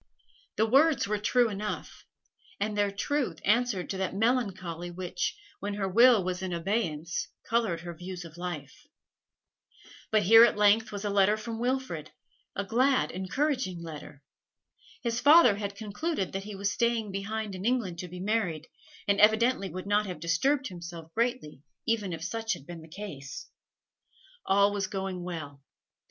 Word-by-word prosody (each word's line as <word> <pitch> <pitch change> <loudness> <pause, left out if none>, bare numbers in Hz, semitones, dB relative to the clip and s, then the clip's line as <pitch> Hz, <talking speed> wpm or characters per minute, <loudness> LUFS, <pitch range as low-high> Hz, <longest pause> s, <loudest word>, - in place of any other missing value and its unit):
The 220 - +3
words 275 +3 +4
were 210 0 -1
true 240 +3 +3
enough, 210 0 -5 0.5
and 210 +1 -1
their 205 -1 +2
truth 275 +8 -1
answered 215 -3 +2
to 190 - -4
that 190 0 -2
melancholy 195 -7 -1
which, 180 - -3 0.2
when 200 0 -3
her 200 -2 -1
will 230 +1 +6
was 180 0 -3
in 190 -1 -3
abeyance, 170 -2 -2 0.2
coloured 225 -8 +1
her 175 -1 -6
views 180 +1 -7
of 165 -1 -11
life. 175 - -7 1.2
But 215 -1 +3
here 225 +4 +9
at 235 - +4
length 210 +2 +4
was 205 0 -5
a 205 - 0
letter 200 +1 +4
from 225 +1 -6
Wilfrid, 245 - -2 0.5
a 200 - -1
glad, 255 +6 +2
encouraging 190 - -1
letter. 150 -3 -9 0.8
His 235 -1 0
father 285 -8 +7
had 200 -1 -4
concluded 210 - -3
that 195 +1 -4
he 210 -1 -7
was 200 +1 -1
staying 235 -2 0
behind 205 +2 -3
in 185 0 -6
England 220 -8 0
to 180 - -5
be 180 +1 -9
married, 185 -6 -1 0.4
and 200 0 +3
evidently 220 0 +4
would 185 0 -6
not 205 +1 +2
have 180 -4 -6
disturbed 260 - +1
himself 170 -2 -9
greatly 235 - -1 0.2
even 220 -5 0
if 165 - -5
such 225 -1 -2
had 140 - -9
been 170 0 -8
the 160 - -13
case. 155 -6 -8 1.0
All 200 +1 +4
was 200 -2 -1
going 190 -3 -4
well. 155 -6 -6
200 Hz, 160 wpm, -29 LUFS, 180-225 Hz, 1.2 s, here